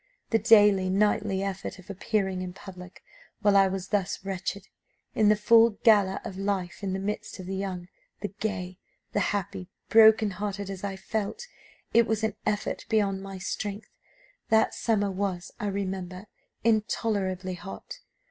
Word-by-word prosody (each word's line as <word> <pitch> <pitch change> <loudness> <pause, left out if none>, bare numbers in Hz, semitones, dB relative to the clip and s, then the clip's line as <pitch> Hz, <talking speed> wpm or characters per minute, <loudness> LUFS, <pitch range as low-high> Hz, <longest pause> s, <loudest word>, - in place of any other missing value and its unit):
The 225 - +4
daily, 205 -4 +5
nightly, 200 0 +1
effort 195 -1 -4
of 185 0 -15
appearing 195 -1 -1
in 180 -1 -5
public, 180 -1 -11 0.4
while 205 -1 +4
I 195 -1 +6
was 190 0 -4
thus 195 -2 -1
wretched, 195 0 -4 0.5
in 215 -1 +4
the 210 - +6
full 225 +1 +5
gala 205 -4 +5
of 190 - -6
life 195 -2 -2
in 195 -2 -2
the 190 - -2
midst 205 +2 -4
of 185 - -8
the 190 +1 -4
young, 185 -2 -4 0.3
the 205 - -2
gay, 190 -3 -4 0.3
the - - +2
happy 185 -2 -2 0.2
broken 220 -1 +6
hearted 200 0 -4
as 190 -1 -7
I 200 -1 -3
felt 220 - -4 0.5
it 235 -1 +5
was 220 0 -1
an 220 -2 +1
effort 210 -1 -2
beyond 200 -3 +1
my 195 0 -7
strength. 205 +3 -4 0.6
That 220 0 +4
summer 205 -3 0
was, 185 -2 -3
I 210 - -2
remember, 190 -1 -4 0.4
intolerably 205 -4 0
hot. 200 - -9
200 Hz, 155 wpm, -27 LUFS, 190-210 Hz, 0.6 s, I